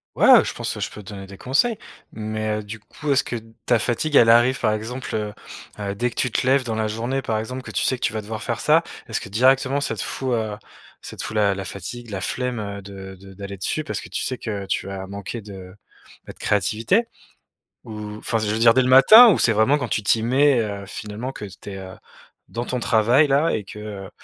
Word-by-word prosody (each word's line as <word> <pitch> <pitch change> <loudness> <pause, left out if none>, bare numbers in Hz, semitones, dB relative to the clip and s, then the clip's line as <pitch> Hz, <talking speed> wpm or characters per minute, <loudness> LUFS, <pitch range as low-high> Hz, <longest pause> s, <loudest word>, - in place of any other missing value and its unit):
Ouais, - - +3
heu, - - +2
je - - -4
pense, - - -3
heu, - - -7
je - - -2
peux 105 - -11
te - - -11
donner 95 -1 -8
des 100 -1 -11
conseils! 200 - +1 0.4
Mais, 110 0 -3
heu, 105 - -5
du 110 +2 -8
coup, 145 +7 -5
est-ce 135 - +3
que 120 - -5 0.3
ta 120 - +4
fatigue 130 +6 -1
elle 115 - +7
arrive, 120 +3 +4
par 110 -2 +1
exemple, 115 +3 -5
heu 105 -1 -3 0.5
heu, 100 -1 -3
dès 120 +4 0
que - - -14
tu 125 - 0
te 130 - -1
lèves 135 0 +4
dans 115 -2 -3
la 110 -1 0
journée, 120 +5 -2
par 110 -3 -1
exemple, 125 +4 -5
que - - -11
tu - - -1
sais 130 - +2
que - - -9
tu - - +1
vas 110 -1 -3
devoir 110 +1 -6
faire - - -3
ça, - - +4 0.3
est-ce - - -3
que 95 - -9
directement 130 +5 +3
ça 115 - -1
te - - -4
fout, 130 -1 -3
heu, 110 -3 -1 0.4
ça - - -9
te - - -5
fout 110 +1 -6
la 100 -2 +3
la 95 0 -5
fatigue, 110 +6 -7
la 95 -2 -4
flemme, 125 +2 -2
heu, 100 -1 -5
de 95 -1 -10
de 95 0 -13
d'aller 100 0 -7
dessus 155 +11 -2
parce - - -4
que - - -11
tu - - -2
sais 130 - -3
que 100 -3 -4
tu 95 - -2
vas 95 -1 -6
manquer 100 +3 -6
de, 95 -2 -11 0.5
bah, - - -9
de - - -23
créativité 110 - +1 0.8
ou, 105 -1 -7
enfin, 115 - -1
je 105 -1 -2
veux 110 - -1
dire, 115 0 +6
dès 130 - +4
le 130 - 0
matin? 215 - +9
Ou - - +1
c'est 115 - +4
vraiment 110 +8 +3
quand 125 -4 -3
tu 105 - 0
t'y 110 +2 +2
mets, 135 +1 +3
heu, 100 -2 -4
finalement 110 +5 -6
que 105 - -7
tu 100 +1 -10
es, - - -7
heu, 95 -1 -9 0.5
dans 120 +1 -4
ton 125 - -2
travail, 120 +7 +3
là, 145 +4 +3
et 105 - -2
que, 105 - -10
heu, 100 -2 -7
110 Hz, 255 wpm, -22 LUFS, 100-125 Hz, 0.8 s, matin